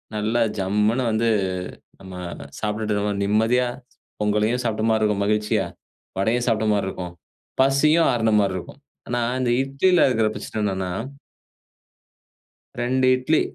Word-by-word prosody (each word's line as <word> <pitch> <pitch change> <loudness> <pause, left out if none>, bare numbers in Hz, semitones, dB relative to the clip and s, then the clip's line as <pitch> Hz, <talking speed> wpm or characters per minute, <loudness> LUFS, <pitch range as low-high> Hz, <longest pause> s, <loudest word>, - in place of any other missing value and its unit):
நல்லா 110 +3 0 0.2
ஜம்முனு 105 +6 +1
வந்து 115 +1 +1 0.7
நம்ம 95 -1 -10 0.4
சாப்ட்டுட்ருக்கும்போ, 105 -1 -1
நிம்மதியா 110 +5 +2 0.5
பொங்கலையும் 105 +4 +1
சாப்ட்ட 110 -1 -1
மாரி 110 -1 +2
இருக்கும், 105 -2 +1
மகிழ்ச்சியா 105 0 +1 0.5
வடையும் 115 +5 +1
சாப்ட்ட 110 -2 +1
மாரி 100 -2 0
இருக்கும், 90 -2 -6 0.5
பசியும் 150 +5 +4
ஆருன 110 -2 +1
மாரி 100 -2 +1
இருக்கும். 90 - -9 0.3
ஆனா 120 0 -1 0.2
இந்த 120 -2 +1
இட்லில 140 +7 +3
இருக்கிற 110 -3 +2
பிரச்சன 110 - -5
என்னான்னா 95 -2 -2 1.9
2 130 +2 +1
இட்லி 130 +5 +1
110 Hz, 120 wpm, -23 LUFS, 105-125 Hz, 1.9 s, பசியும்